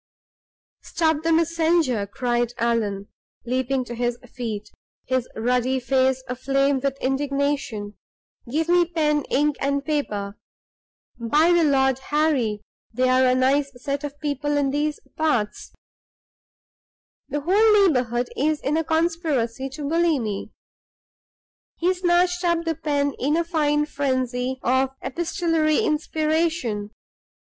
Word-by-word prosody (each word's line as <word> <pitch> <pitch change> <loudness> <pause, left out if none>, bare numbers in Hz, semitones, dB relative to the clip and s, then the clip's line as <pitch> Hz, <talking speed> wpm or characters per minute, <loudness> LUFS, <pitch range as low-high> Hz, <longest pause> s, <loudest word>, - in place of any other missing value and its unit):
"Stop 315 -2 0
the 330 +1 0
messenger!" 325 -8 +2
cried 240 +1 -1
Allan, 215 -4 -1 0.4
leaping 255 +1 -1
to 240 - -7
his 240 0 -1 0.2
feet, 220 -5 -5 0.3
his 255 -1 -1
ruddy 250 +3 +1
face 260 +1 +1
aflame 275 +2 +1
with 275 0 -2
indignation. 275 -6 -1 0.6
"Give 320 +4 0
me 350 0 +4
pen, 305 -3 0
ink, 295 +1 +1
and 280 0 -1
paper! 210 -10 -2 0.8
By 300 +9 +3
the 345 -1 +4
Lord 265 -3 +2
Harry, 265 -8 0 0.3
they're 255 +2 +3
a 250 - +3
nice 275 +2 +2
set 280 +3 -4
of 290 0 -6
people 290 0 -1
in 280 -2 +1
these 295 +1 -1 0.2
parts; 250 -10 -1 1.6
the 290 +1 -2
whole 410 +5 +5
neighborhood 245 -6 +1
is 305 +2 +1
in 300 +3 -1
a 325 - +1
conspiracy 315 -6 -1
to 285 +1 -6
bully 330 0 +2
me!" 210 -5 -4 1.3
He 360 +2 +2
snatched 355 0 +1
up 340 -1 +1
the 330 - 0
pen 290 -3 -1
in 290 +5 +1
a 335 - +2
fine 300 -3 +1
frenzy 260 -3 -1
of 260 +2 +1
epistolary 330 -1 0
inspiration. 310 - 0
280 Hz, 120 wpm, -23 LUFS, 250-315 Hz, 1.6 s, whole